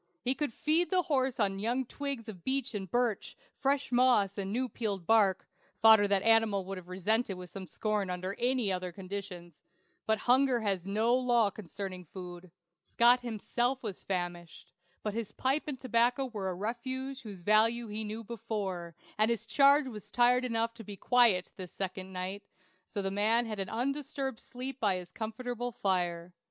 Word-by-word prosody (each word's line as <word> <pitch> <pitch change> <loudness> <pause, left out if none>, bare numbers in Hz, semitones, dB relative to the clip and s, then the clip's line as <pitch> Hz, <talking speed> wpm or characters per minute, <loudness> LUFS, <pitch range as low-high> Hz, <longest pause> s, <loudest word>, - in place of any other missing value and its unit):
He 255 - +2
could 295 -1 -2
feed 315 +8 +1
the 370 -2 +2
horse 265 -5 0
on 195 -2 +1
young 240 +5 0
twigs 275 -3 -5
of 185 -6 -9
beech 270 -1 -1
and 195 -3 -4
birch; 240 0 -1 0.2
fresh 275 0 0
moss, 240 -6 +4
and 195 -1 -3
new 255 +4 0
peeled 205 -7 -3
bark 205 -3 +3 0.3
(fodder 220 -2 +7
the 200 0 +1
animal 225 -4 +4
would 195 0 -5
have 175 - -15
resented 195 +2 0
with 180 +1 -10
scorn 210 -1 -1
under 185 +2 -3
any 245 -4 +1
other 180 -1 -2
conditions); 185 -3 -7 0.5
but 220 0 +3
hunger 255 -1 +4
has 195 -4 -1
no 220 +4 +2
law 240 -4 +3
concerning 190 -1 -7
food. 180 +1 -9 0.3
Scott 240 +1 +4
himself 245 +2 -1
was 205 -5 -5
famished; 175 -2 -4 0.3
but 210 - -2
his 225 -2 -4
pipe 270 +4 0
and 275 -4 -4
tobacco 245 +1 +2
were 210 -7 -4
a 185 - -3
refuge 260 +6 -4
whose 205 -6 -9
value 225 +4 +3
he 215 +1 -3
knew 215 +2 -5
before, 195 -7 -4 0.2
and 215 +1 +4
his 230 -1 0
charge 280 +4 +5
was 215 -5 -8
tired 245 +1 +4
enough 230 -2 0
to 230 -1 -10
be 205 -1 -8
quiet 230 -6 +3
this 185 -3 -7
second 190 0 -5
night; 185 +2 -4 0.5
so 200 -2 -4
the 195 - -1
man 220 +4 +3
had 215 -2 -5
an 190 -1 -3
undisturbed 270 +1 -2
sleep 260 +1 -6
by 205 -5 +2
his 180 -1 -7
comfortable 245 +3 -4
fire. 180 -5 -1
220 Hz, 175 wpm, -31 LUFS, 195-245 Hz, 0.5 s, fodder